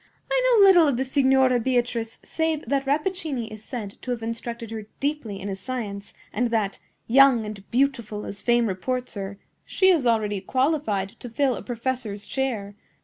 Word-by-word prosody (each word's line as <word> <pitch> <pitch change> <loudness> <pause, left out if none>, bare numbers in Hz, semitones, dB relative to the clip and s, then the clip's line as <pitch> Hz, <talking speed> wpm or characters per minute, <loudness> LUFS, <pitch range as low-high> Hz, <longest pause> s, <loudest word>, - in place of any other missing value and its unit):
I - - +3 0.2
know 400 - +8
little 355 -5 +7
of 275 -4 +1
the 260 - +1
Signora 265 -1 +3
Beatrice 240 -2 -1
save 320 -2 -1
that 275 +2 -1
Rappaccini 300 - -1
is 215 0 -9
said 220 -5 -7
to - - -8
have 240 -2 -2
instructed 230 0 -5
her 220 -2 -6
deeply 275 -9 -2
in 200 - -6
his 195 -1 -4
science, 205 -4 -5 0.2
and 245 +3 +1
that, 215 -4 -1 0.3
young 260 -2 +5
and 210 -2 -7
beautiful 235 -5 0
as 200 0 -6
fame 240 -1 +3
reports 250 +6 -2
her, 200 -1 -5 0.3
she 380 -1 +3
is 320 -9 +3
already 210 -4 +1
qualified 255 -5 0
to 245 - -8
fill 260 +3 +1
a - - -6
professor's 235 -4 -4
chair. 230 -7 -2
240 Hz, 175 wpm, -25 LUFS, 215-270 Hz, 0.3 s, know